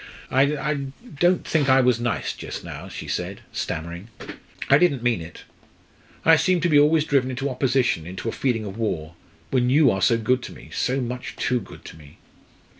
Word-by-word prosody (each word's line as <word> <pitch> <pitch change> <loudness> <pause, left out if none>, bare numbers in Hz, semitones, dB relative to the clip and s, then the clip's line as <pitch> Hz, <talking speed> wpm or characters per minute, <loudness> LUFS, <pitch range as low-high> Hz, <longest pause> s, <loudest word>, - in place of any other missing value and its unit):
"I 140 +1 +1 0.3
don't 175 +1 +2
think 145 -4 +1
I 130 0 +6
was 125 -2 +3
nice 120 -2 -1
just - - -7
now," - - -8
she - - -7
said, - - -4
stammering. 85 +5 -5 0.6
"I 140 - +6
didn't 140 -8 +2
mean 120 -7 +1
it. 80 +1 -10 0.8
I 165 0 +7
seem 185 +3 +2
to 175 - +2
be 150 -2 +6
always 150 +1 +4
driven 135 -4 +2
into 135 +2 -2
opposition 125 - +1
into 95 +5 -6
a - - 0
feeling 115 -4 -1
of 100 +2 -7
war 85 -8 -2 0.4
when 125 -2 +2
you 140 -1 +5
are 95 - -2
so 115 - +4
good 125 +3 +1
to - - -8
me - - -14
so 130 +2 0
much 125 0 -5
too 125 - 0
good 105 - -13
to - - -10
me!" 75 -2 -16
125 Hz, 190 wpm, -23 LUFS, 115-140 Hz, 0.8 s, I